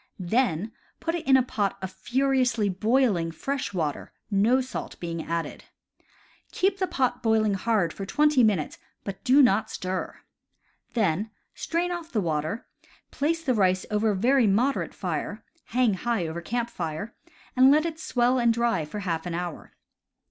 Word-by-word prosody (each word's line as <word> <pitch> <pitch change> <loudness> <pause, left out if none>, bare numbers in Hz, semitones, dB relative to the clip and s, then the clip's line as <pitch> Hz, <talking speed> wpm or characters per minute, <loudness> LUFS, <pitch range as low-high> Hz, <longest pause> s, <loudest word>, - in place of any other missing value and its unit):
Then 210 0 0 0.3
put 330 - -2
it 340 -5 -4
in 265 -1 +7
a 260 - +3
pot 205 -5 -1
of 190 -1 -5
furiously 245 +1 +1
boiling 210 -3 +2
fresh 270 - -3
water, 160 -7 -3 0.2
no 215 +6 +4
salt 255 -1 -5
being 165 -2 -4
added. 170 0 -4 0.9
Keep 385 +1 +1
the 375 - +1
pot 260 -6 0
boiling 220 -2 +2
hard 195 -4 +1
for 195 - -6
twenty 295 +5 +3
minutes, 200 -9 +1 0.2
but 195 -1 -7
do 275 +1 +6
not 220 -4 +3
stir. 185 0 -4 0.8
Then 210 -1 +1 0.2
strain 345 +2 -2
off 340 -1 -5
the 225 - 0
water, 160 +3 -2 0.5
place 325 +3 -1
the 265 -5 +1
rice 185 -4 +2
over 210 +1 +2
a 205 - +1
very 245 +4 +3
moderate 240 +8 +1
fire - - -4 0.2
(hang 245 -3 +2
high 210 0 -1
over 165 +1 -4
camp 235 +6 -2
fire), 165 +6 -4 0.4
and 260 +1 +7
let 305 +3 +4
it 325 -1 -4
swell 250 -4 +1
and 235 -1 +4
dry 230 -8 +1
for 205 +7 -6
half 170 -3 -2
an 170 - -3
hour. 175 -2 -6
225 Hz, 165 wpm, -26 LUFS, 185-260 Hz, 0.9 s, in